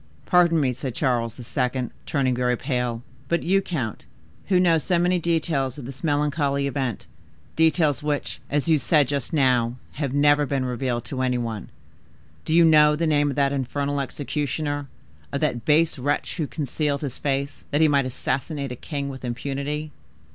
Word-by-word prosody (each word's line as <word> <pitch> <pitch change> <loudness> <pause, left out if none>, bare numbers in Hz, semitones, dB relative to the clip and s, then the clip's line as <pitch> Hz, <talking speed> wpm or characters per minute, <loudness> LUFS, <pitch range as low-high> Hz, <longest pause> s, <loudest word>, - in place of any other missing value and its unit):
"Pardon 175 -2 +4
me," 130 -4 +1
said 130 -1 -5
Charles 120 -5 0
II., 125 0 -2 0.2
turning 130 -3 +1
very 125 0 +1
pale, 125 -3 -2 0.2
"but 170 +3 0
you, 195 +3 +3
count, 130 - -4 0.4
who 185 -2 +4
know 170 -3 +4
so 175 +3 +1
many 180 +1 +2
details 155 -6 0
of 140 - -7
this 135 +4 -9
melancholy 145 -2 +1
event,—details 145 - -1
which, 150 -1 -2
as 145 +2 0
you 160 -2 +4
said 150 -1 +3
just 140 -1 -2
now, 125 -6 +2 0.2
have 140 -3 -3
never 145 +1 +4
been 135 -2 -1
revealed 125 -1 -2
to 130 -2 -4
any 125 -1 +1
one,—do 105 - -9
you 170 +1 +6
know 150 -1 +6
the 165 +2 0
name 145 -2 +3
of 140 - -3
that 140 -1 +2
infernal 140 +1 -1
executioner, 145 +1 -3 0.4
of 140 - -1
that 120 -7 -1
base 155 -1 +3
wretch 145 +3 -1
who 155 -4 -1
concealed 145 +2 -2
his 135 -4 -4
face 140 -1 -2
that 145 - +1
he 160 - +6
might 140 -3 +2
assassinate 135 +2 -3
a - - -4
king 140 +2 -4
with 135 -1 -7
impunity?" 140 +5 -3
140 Hz, 170 wpm, -24 LUFS, 130-150 Hz, 0.4 s, you